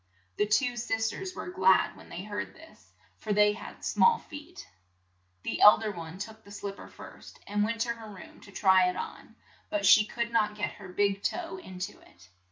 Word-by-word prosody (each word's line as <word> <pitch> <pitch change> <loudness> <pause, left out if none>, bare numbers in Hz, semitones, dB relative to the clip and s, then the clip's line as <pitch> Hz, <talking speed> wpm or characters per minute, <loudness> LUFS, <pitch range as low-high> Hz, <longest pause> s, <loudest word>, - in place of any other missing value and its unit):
The 210 - +2
two 245 +3 +2
sis 225 -1 -1
ters 375 -2 -6
were - - -6
glad 190 - +4
when - - -15
they 180 - -6
heard 205 0 -5
this, 320 0 -17 0.3
for 215 - -4
they 210 0 +5
had - - -10
small 465 -1 +4
feet. 315 +4 -11 0.8
The - - -3
eld 210 +2 +8
er 215 - -1
one 165 -2 -8
took 220 +2 -8
the 200 - -16
slip 200 0 -6
per - - -11
first, - - -13
and 205 +1 0
went 230 +1 -1
to 235 - 0
her 225 -2 -11
room 200 -3 -12
to 200 - -14
try 190 -2 +4
it 180 - -4
on, - - -7 0.3
but 205 -1 -1
she 215 +2 +8
could 235 +2 -3
not 210 -2 +1
get 210 - -2
her 195 - -11
big 200 +1 +1
toe 350 - -3
in 190 - -10
to 190 +3 -5
it. 85 +1 -20
210 Hz, 210 wpm, -29 LUFS, 200-235 Hz, 0.8 s, eld